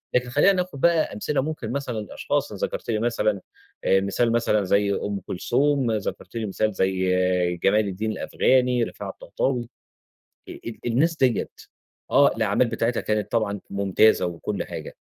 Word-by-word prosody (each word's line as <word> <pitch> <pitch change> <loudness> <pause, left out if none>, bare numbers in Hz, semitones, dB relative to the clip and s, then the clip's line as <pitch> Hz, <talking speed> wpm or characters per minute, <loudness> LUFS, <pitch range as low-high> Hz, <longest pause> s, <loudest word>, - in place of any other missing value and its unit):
لكن 125 0 +1
خلينا 145 +10 +4
ناخد 180 -6 -3
بقى 170 -2 +3
أمثلة 135 +7 -1
ممكن 140 -6 -4
مثلًا 130 -4 -3
لأشخاص 105 - -2
ذكرت - - -4
لي 110 -2 +1
مثلًا 110 -3 0 0.5
مثال 100 +5 +2
مثلًا 115 -3 +2
زَي 100 +1 +2
أم 100 0 -2
كلثوم، 135 +7 0
ذكرت 105 -2 -4
لي 115 -1 -2
مثال 105 +2 -1
زَي 90 -2 +1
جمال 105 +2 +3
الدين 105 +3 -2
الأفغاني، 125 +3 +2
رفاعة - - -6
الطهطاوي 120 -3 -3 0.8
ال - - -8
ال 115 - -7
الناس 150 +8 +2
ديّة 130 -5 +1 0.6
آه، 140 - +5
الأعمال 110 +2 +2
بتاعتها 115 +1 0
كانت 105 -1 -1
طبعًا 105 -3 0
ممتازة 100 0 +3
وكل 85 -1 -4
حاجة، - - -8
110 Hz, 145 wpm, -24 LUFS, 100-125 Hz, 0.8 s, آه